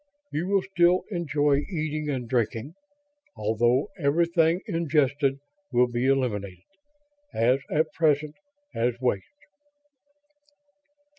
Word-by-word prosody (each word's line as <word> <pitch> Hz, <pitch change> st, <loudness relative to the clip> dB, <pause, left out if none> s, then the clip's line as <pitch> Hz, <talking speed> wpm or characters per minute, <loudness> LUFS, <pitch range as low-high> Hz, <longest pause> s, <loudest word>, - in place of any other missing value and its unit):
You 165 Hz, +4 st, -2 dB
will 195 Hz, -1 st, +2 dB
still 175 Hz, -1 st, +2 dB
enjoy 150 Hz, -5 st, +1 dB
eating 155 Hz, -4 st, -3 dB
and 130 Hz, -4 st, -3 dB
drinking, 115 Hz, +3 st, -1 dB, 0.6 s
although 115 Hz, +4 st, +1 dB
everything 165 Hz, +3 st, +2 dB
ingested 145 Hz, -4 st, +1 dB, 0.3 s
will 125 Hz, 0 st, +4 dB
be 120 Hz, +1 st, -1 dB
eliminated, 105 Hz, -9 st, -1 dB, 0.7 s
as 125 Hz, +4 st, +3 dB
at 155 Hz, +1 st, 0 dB
present, 150 Hz, -2 st, +1 dB, 0.4 s
as 120 Hz, +1 st, -1 dB
waste." 125 Hz, -7 st, -1 dB
140 Hz, 95 wpm, -26 LUFS, 120-160 Hz, 0.7 s, will